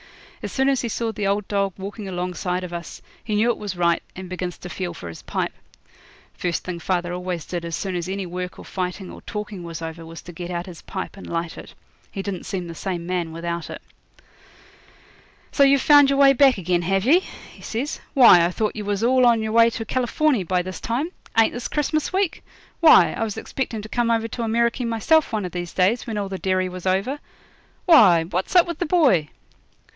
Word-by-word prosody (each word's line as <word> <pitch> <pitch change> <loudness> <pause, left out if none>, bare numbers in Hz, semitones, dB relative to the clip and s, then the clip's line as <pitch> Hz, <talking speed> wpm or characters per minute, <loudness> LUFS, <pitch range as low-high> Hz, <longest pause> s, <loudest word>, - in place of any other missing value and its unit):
As - - -5
soon 265 0 +1
as 270 -2 +1
he 240 - -2
saw 225 +1 -2
the 210 -2 -2
old 200 0 0
dog 200 -2 0
walking 200 +2 -7
alongside 180 0 -3
of 175 -1 -7
us 170 -1 -7 0.2
he 215 - -2
knew 225 +3 +3
it - - -4
was 205 -3 -5
right, 170 -1 +2
and 185 0 -7
begins 180 -1 -5
to 180 - -9
feel 175 -1 -4
for 85 - -8
his 85 - -9
pipe. - - -3 0.8
First 175 -2 -2
thing 180 -2 -5
father 175 0 -1
always 180 -2 -4
did 175 -2 -4
as 170 -1 -3
soon 190 -2 -3
as 175 +1 -3
any 195 0 -3
work 180 +1 -5
or - - -11
fighting 185 0 -4
or - - -11
talking 210 -3 -6
was 165 -2 -6
over 165 0 -6
was 165 0 -10
to 175 - -9
get 175 +1 -7
out 175 -1 -3
his 175 -4 -11
pipe 190 -2 -6
and 195 - -10
light 165 0 -3
it. - - -11 0.4
He 195 - -5
didn't 195 -3 -5
seem 185 -2 -3
the 170 - -7
same 175 +1 -4
man 175 -2 -2
without 170 0 -4
it. - - -7 1.7
'So - - 0
you've 275 -1 +5
found 290 -2 +7
your 275 - +2
way 275 -1 +7
back 270 -2 +5
again, 180 -1 0
have 195 +3 0
ye?' 315 +8 +6 0.3
he - - -16
says. 255 +7 -4 0.2
'Why, 235 -10 +8
I 170 - +2
thought 215 +4 -2
you 210 -2 -5
was 205 +1 -1
all 255 +1 +4
on 230 -2 +3
your 220 - -2
way 230 +1 +6
to 225 -1 -5
Californy 255 0 +1
by 180 +1 0
this 185 +1 -7
time. 270 +9 -2 0.3
Ain't 225 - +5
this 245 - -4
Christmas 300 +1 -1
week? 380 -2 -1 0.4
Why, 325 -2 +7
I - - -2
was 215 -2 -3
expecting 230 -5 -4
to 220 - -9
come 240 0 0
over 225 -1 +1
to 235 - -5
Ameriky 235 +2 +1
myself 235 +8 +2
one 215 -4 -1
of 180 - -5
these 175 -1 -5
days, 195 +8 +1
when 220 -2 -3
all 200 -1 -2
the 190 -1 -5
derry 185 -1 0
was 180 0 -6
over 195 +10 0 0.7
Why, 200 - +7
what's 180 - -3
up 355 - +7
with 340 -2 -6
the 350 - -1
boy?' 265 - +3
195 Hz, 225 wpm, -23 LUFS, 180-235 Hz, 1.7 s, Why